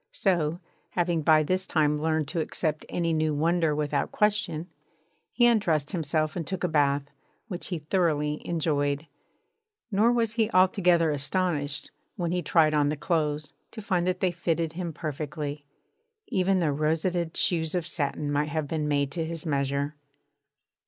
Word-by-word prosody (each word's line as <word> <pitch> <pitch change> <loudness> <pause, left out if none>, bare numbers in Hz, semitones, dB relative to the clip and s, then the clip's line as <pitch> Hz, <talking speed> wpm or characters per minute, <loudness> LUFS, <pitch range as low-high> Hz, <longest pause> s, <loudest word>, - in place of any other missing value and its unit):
So, 170 -4 +1 0.3
having 175 -2 +1
by 155 0 +5
this 185 +4 -1
time 150 -1 +2
learnt 160 -2 0
to 170 - -2
accept 155 -1 -2
any 170 -1 0
new 155 -1 +1
wonder 165 0 +2
without 145 -1 -1
question, 205 -6 0 0.6
he 240 - +3
undressed 175 -11 +2
himself 155 -3 -1
and 170 -4 -4
took 190 -2 -3
a - - +3
bath, 145 -3 +2 0.5
which 180 -3 -4
he 180 - -2
thoroughly 150 -2 0
enjoyed. 145 -3 0 0.9
Nor 215 +4 +4
was 230 -2 +1
he 225 -2 +1
altogether 180 -3 +4
astonished, 145 0 -1 0.2
when 170 -1 -2
he 180 0 0
tried 155 -1 +3
on 145 -1 +3
the 150 - -2
clothes, 150 -1 -1 0.2
to 225 - -9
find 185 -4 0
that 185 0 -1
they 185 -2 +2
fitted 165 -2 -1
him 175 -1 -4
perfectly. 150 -1 -5 0.6
Even 190 0 +2
the 165 -5 +1
rosetted 160 +3 0
shoes 160 -1 +1
of 175 -2 -1
satin 145 -2 -2
might 145 +1 0
have 155 -1 -2
been 155 0 -2
made 140 -1 +1
to 165 +2 -2
his 165 +1 -4
measure. 140 0 -1
160 Hz, 160 wpm, -27 LUFS, 150-180 Hz, 0.9 s, by